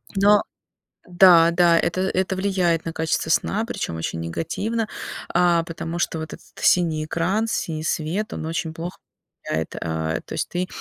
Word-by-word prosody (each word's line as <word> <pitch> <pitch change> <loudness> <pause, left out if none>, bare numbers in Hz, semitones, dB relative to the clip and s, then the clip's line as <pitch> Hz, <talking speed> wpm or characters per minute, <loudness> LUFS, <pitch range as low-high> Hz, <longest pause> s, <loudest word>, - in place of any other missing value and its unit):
Но 205 +1 +5 0.7
да-да, 170 -1 +6
это 185 - -1
это 190 0 0
влияет 185 -4 +1
на 165 - -4
качество 160 0 -1
сна, 215 +6 +1
причём 85 - -4
очень 80 0 -3
негативно, 205 - -2 0.4
а, 175 -1 +4
потому 165 0 -5
что 165 - -1
вот 160 -1 -6
этот - - -11
синий 160 -4 +3
экран, 185 +8 0
синий 160 -8 -3
свет, 170 +8 -2
он - - -5
очень 160 0 -3
плохо 170 +2 -6 0.5
влияет. 80 0 -3
Э, 80 -1 -2
то - - -10
есть - - -2
ты 180 +1 -2
170 Hz, 155 wpm, -23 LUFS, 160-185 Hz, 0.7 s, да-да